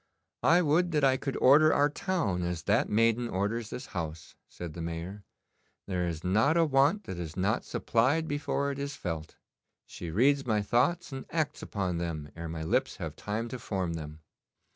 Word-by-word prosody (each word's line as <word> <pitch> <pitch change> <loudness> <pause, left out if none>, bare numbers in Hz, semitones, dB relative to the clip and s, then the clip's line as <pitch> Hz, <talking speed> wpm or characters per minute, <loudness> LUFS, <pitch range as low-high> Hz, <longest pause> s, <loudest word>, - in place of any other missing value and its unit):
'I 175 +2 +5
would 170 +3 +2
that 150 -2 +2
I 135 -1 +5
could 135 0 -3
order 155 +4 +6
our 145 - +4
town 145 - -1
as 85 -2 -3
that - - +2
maiden 115 +2 +2
orders 105 +4 -1
this 125 - -6
house,' 80 -3 -5 0.2
said 85 -3 -7
the 85 - -6
Mayor. 85 +5 -5 0.6
'There 90 -2 -1
is 80 -1 -4
not 110 - +3
a 165 - +5
want 145 +8 +3
that 90 - -6
is 80 -1 -6
not 100 +5 +1
supplied 140 +8 +1
before 140 -1 -1
it 140 - -6
is 140 0 -3
felt. 80 - -5 0.5
She 85 - -7
reads 135 - +3
my 105 -2 +2
thoughts 145 - +1
and 135 -1 -6
acts 155 -3 -1
upon 95 -4 -2
them 80 -4 -4
ere 85 0 -6
my 80 -1 -4
lips 80 - 0
have - - -5
time 110 +3 -3
to 125 - -6
form 95 -6 -2
them. 75 -1 -7
110 Hz, 185 wpm, -29 LUFS, 85-140 Hz, 0.6 s, order